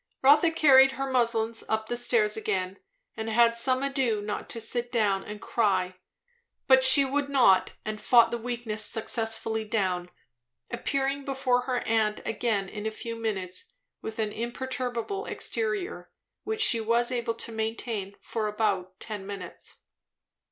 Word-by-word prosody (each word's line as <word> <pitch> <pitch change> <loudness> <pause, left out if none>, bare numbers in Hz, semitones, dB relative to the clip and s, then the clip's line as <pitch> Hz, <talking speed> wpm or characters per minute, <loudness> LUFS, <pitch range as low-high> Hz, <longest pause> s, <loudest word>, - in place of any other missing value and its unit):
Rotha 295 +5 +6
carried 270 -4 +6
her 270 +1 -3
muslins 230 -2 +1
up 220 +2 -1
stairs 230 -3 +2
again, 190 -3 -2 0.4
and 220 0 -4
had 230 +1 +4
some 255 +3 +1
ado 265 -6 0
not 205 0 -5
to 230 - -5
sit 240 +2 -2
down 205 -5 +1
and 210 0 -8
cry. 185 -6 0 0.7
But 265 -1 +5
she 265 +1 +7
would 280 +1 -1
not, 245 -9 +4
and 215 0 -4
fought 235 -2 +5
the 235 - -2
weakness 230 -2 -3
successfully 225 0 -1
down, 185 -5 -1 0.6
appearing 275 +3 -1
before 265 -2 0
her 255 -2 -1
aunt 220 -2 0
again 220 -3 -1
in 210 +2 -5
a - - +1
few 230 +1 -6
minutes 190 -5 -4 0.3
with 220 0 -7
an 215 -2 -1
imperturbable 250 - -4
exterior. 425 -3 -3 0.4
Which 440 0 -2
she 230 - +5
was 235 +2 +1
able 235 -2 -2
to 230 - -4
maintain 220 -2 -4 0.2
about 210 -4 -1
ten 205 -3 -5
minutes. 200 -2 -8
230 Hz, 145 wpm, -27 LUFS, 215-255 Hz, 0.7 s, she